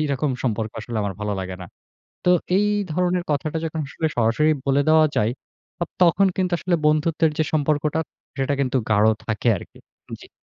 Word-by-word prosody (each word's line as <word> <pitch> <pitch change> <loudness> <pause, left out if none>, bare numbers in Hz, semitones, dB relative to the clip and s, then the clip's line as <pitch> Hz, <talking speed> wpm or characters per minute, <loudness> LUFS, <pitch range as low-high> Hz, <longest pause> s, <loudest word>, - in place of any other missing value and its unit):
এইরকম 145 -1 0
সম্পর্ক 110 -3 -1
আসলে 115 +1 -6
আমার 100 -1 -3
ভালো 105 0 -2
লাগে 95 -1 -5
না। - - -8 0.6
তো 180 - +4 0.3
এই 210 +1 +2 0.2
ধরনের 180 +1 0
কথাটা 150 +2 -1
যখন 160 0 -3
আসলে 160 - -2
সরাসরি 120 +7 +3 0.2
বলে 140 +1 +3
দেওয়া 155 0 +6
যায়, 105 +2 +2 0.5
অপ 170 - -2
তখন 180 +3 +5
কিন্তু 185 -1 0
আসলে 180 0 0
বন্ধুত্বের 155 +1 +2
যে 155 - +3
সম্পর্কটা 150 +1 +1 0.4
সেটা 135 +1 0
কিন্তু 130 -1 0
গাঢ় 105 0 +4 0.2
থাকে 110 +2 -1
আরকি। - - -12 0.4
জি। - - -14
150 Hz, 175 wpm, -22 LUFS, 115-160 Hz, 0.6 s, দেওয়া